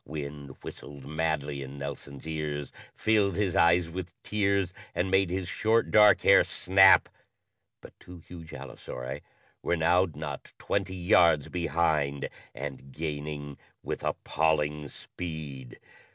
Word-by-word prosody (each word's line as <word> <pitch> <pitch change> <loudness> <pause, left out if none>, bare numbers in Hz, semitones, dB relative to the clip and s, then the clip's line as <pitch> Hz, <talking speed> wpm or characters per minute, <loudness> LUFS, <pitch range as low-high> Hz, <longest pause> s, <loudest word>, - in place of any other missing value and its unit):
Wind 70 -2 -7
whistled 70 -2 -9
madly 75 -2 -2
in 70 +1 -8
Nelson's 70 0 -7
ears, 75 -3 -4 0.2
filled 105 -4 +2
his 95 -2 0
eyes 85 -1 +4
with 90 +1 -6
tears, 100 -3 0 0.2
and 95 +2 0
made 95 -1 +3
his 90 0 -2
short, 110 +5 +1
dark 105 -1 +7
hair - - +7
snap, 95 +1 +5 0.7
but - - -13
two 90 0 -12
huge 85 -1 -12
allosauri 65 +3 -7 0.4
were 85 - 0
now 90 +3 +3
not 75 -2 -7
twenty 95 -2 -2
yards 85 -4 +4
behind 80 -4 0 0.3
and 65 -1 -6
_gaining 75 -1 -5 0.2
with - - -4
appalling 75 -2 0
speed! 75 -7 -8
80 Hz, 125 wpm, -28 LUFS, 70-90 Hz, 0.7 s, dark